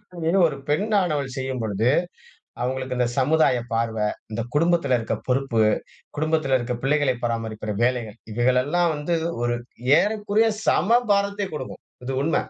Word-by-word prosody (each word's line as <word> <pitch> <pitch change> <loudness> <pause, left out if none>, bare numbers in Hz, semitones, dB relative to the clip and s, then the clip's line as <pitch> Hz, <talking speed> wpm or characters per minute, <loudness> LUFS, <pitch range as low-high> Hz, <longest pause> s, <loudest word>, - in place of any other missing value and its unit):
தொழில் 170 +3 +1
ஒரு 150 - -4
பெண்ணானவள் 155 -7 0
செய்யும்பொழுது, 120 -4 -1 0.7
அவங்களுக்கு 130 0 -2
இந்த 125 - +3
சமுதாய 145 -1 +3 0.2
பார்வ, 115 -1 -1 0.3
இந்த 115 +2 -2
குடும்பத்துல 165 -4 +3
இருக்க 115 - -2
பொறுப்பு, 130 -3 +1 0.6
குடும்பத்துல 155 -3 +1
இருக்க 125 0 -3
பிள்ளைகளை 140 -2 +2
பராமரிக்கிற 110 -2 -3
வேலைகள் 120 -4 -1 0.2
இவைகளெல்லாம் 130 +9 +2
வந்து 150 +4 -1 0.3
ஒரு 120 0 +1 0.5
ஏறக்குறைய 210 +1 +1 0.2
சம 180 +8 +2 0.2
பாரத்தை 200 0 0
குடுக்கும். 130 -4 -7 0.2
இது 135 +1 -3
உண்ம. 160 0 +1
135 Hz, 125 wpm, -23 LUFS, 120-165 Hz, 0.7 s, இந்த